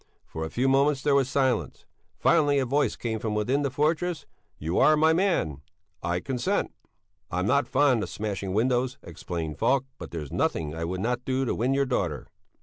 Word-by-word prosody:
For 80 - -6
a 80 - -3
few 125 +8 0
moments 135 0 +3
there 145 - +3
was 135 -2 +3
silence. 130 -1 0 0.3
Finally 145 -4 +3
a 135 - +2
voice 140 +4 +1
came 110 -2 -3
from 105 -1 -2
within 125 +7 +1
the 140 - 0
fortress: 155 +4 0 0.3
"You 80 +4 -1
are 155 0 +5
my 160 +1 +4
man! 165 - 0 0.4
I 85 +1 -1
consent." 125 +3 -1 0.6
"I'm 90 +2 -1
not 140 +6 +2
fond 135 -4 +3
of - - -4
smashing 100 -3 -4
windows," 125 +3 +1
explained 85 -2 -5
Falk, 130 +3 +2
"but - - -7
there's 75 -5 -6
nothing 75 -1 -1
I 85 +1 -3
would 90 +2 -3
not 120 +3 -1
do 130 +1 0
to - - 0
win 125 +4 0
your 140 0 +2
daughter." 90 - -2
125 Hz, 190 wpm, -26 LUFS, 95-140 Hz, 0.6 s, are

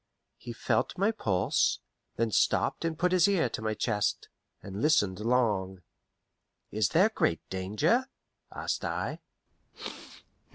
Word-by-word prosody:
He - - -7
felt - - -1
my 200 +4 +2
pulse; 100 - +1 0.4
then 115 -1 0
stopped - - +1
and 165 -1 -2
put 180 +1 +1
his 185 -1 +5
ear 185 -10 +2
to 110 - -5
my 110 0 -1
chest, 105 -2 -1 0.3
and 100 +2 -6
listened 105 - +2
long. 105 -6 0 0.9
"Is 105 -2 +1
there 185 - +4
great 85 - -1
danger?" 110 - +1 0.4
asked - - -3
I. - - -3
115 Hz, 125 wpm, -29 LUFS, 100-170 Hz, 0.9 s, his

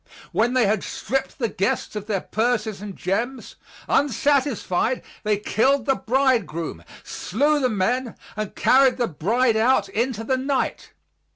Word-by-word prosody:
When 240 +3 +1
they 250 -3 +4
had 205 0 +1
stripped 270 +3 -3
the 235 - 0
guests 200 +1 -2
of 210 0 -5
their 200 -4 -1
purses 220 -3 -1
and 205 -2 -7
gems, 235 +8 -3 0.3
unsatisfied, 260 -4 +1 0.2
they 210 -1 +1
killed 250 +5 +1
the 270 - +3
bridegroom, 220 - 0 0.2
slew 290 +8 0
the 255 -3 +1
men, 235 +4 -1 0.2
and 215 -2 -4
carried 265 -1 +4
the 245 - +1
bride 220 - +1
out 220 -3 +3
into 225 +2 -1
the 260 +3 0
night. 270 +1 -2
230 Hz, 145 wpm, -23 LUFS, 210-260 Hz, 0.3 s, they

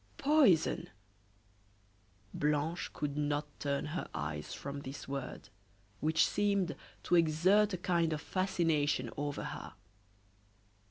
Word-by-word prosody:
"Poison!" 280 - +4 1.4
Blanche 150 +3 0
could 145 -1 -3
not 145 0 0
turn 140 -1 -1
her 155 +3 -4
eyes 75 -1 -4
from 140 0 -5
this 140 0 -8
word, 135 -2 -5 0.5
which 160 +1 +3
seemed 200 -4 +1 0.3
to - - -2
exert 175 +6 +4
a - - -5
kind 170 -2 +1
of 155 - -1
fascination 160 -8 0
over 145 0 -3
her. - - -6
155 Hz, 110 wpm, -33 LUFS, 145-180 Hz, 1.4 s, Poison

